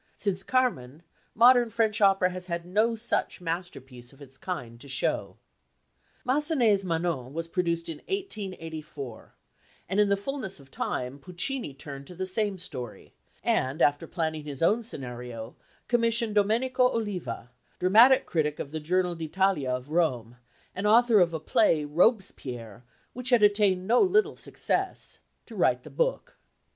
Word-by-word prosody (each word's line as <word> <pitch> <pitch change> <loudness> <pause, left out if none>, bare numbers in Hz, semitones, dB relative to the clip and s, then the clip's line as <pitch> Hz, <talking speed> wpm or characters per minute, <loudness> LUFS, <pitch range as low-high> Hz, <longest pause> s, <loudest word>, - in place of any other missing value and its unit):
Since 195 -2 -1
Carmen 175 - -1 0.3
modern 240 +1 +6
French 220 -2 0
opera 195 -2 +4
has 180 0 -7 0.2
no 215 +6 +1
such 225 +1 -2
masterpiece 165 -8 -6
of 135 - -20
its 135 -2 -14
kind 120 -8 -6
to 140 - -12
show. 135 - -2 0.9
Massenet's 255 - +3
Manon 165 -7 -2
was 165 +1 -4
produced 170 -1 -1
in 165 -2 -5
1884, 165 - -6 0.5
and 190 +3 0
in 205 -1 +4
the 200 - +3
fulness 200 - -5
of 135 -1 -17
time 125 +3 -3
Puccini 180 - -4
turned 140 0 -9
to 180 - -11
the 185 +2 -3
same 200 +1 -1
story, 125 -10 -8 0.3
and 130 +4 0
after 145 +3 +2
planning 160 -3 -2
his 145 0 -5
own 215 +7 +3
scenario, 125 - -6 0.3
commissioned 230 -2 +1
Domenico 235 +5 +3
Oliva 180 - -4 0.3
dramatic 225 +8 +6
critic 150 -3 -1
of 140 - -6
the 160 - -3
Journal 180 +3 0
d'Italia 165 -2 0
of 125 +3 -3
Rome, 125 -9 0 0.4
and 200 +3 -2
author 230 0 +6
of 175 -2 +4
a 160 - -3
play 155 -1 +2
Robespierre 140 - 0 0.3
which 250 +1 -3
had 240 -4 +4
attained 205 -3 +3
no 235 +5 +4
little 410 +2 +3
success - - -2 0.3
to - - -12
write - - +2
the - - -11
"book." - - -1
180 Hz, 145 wpm, -27 LUFS, 145-220 Hz, 0.9 s, modern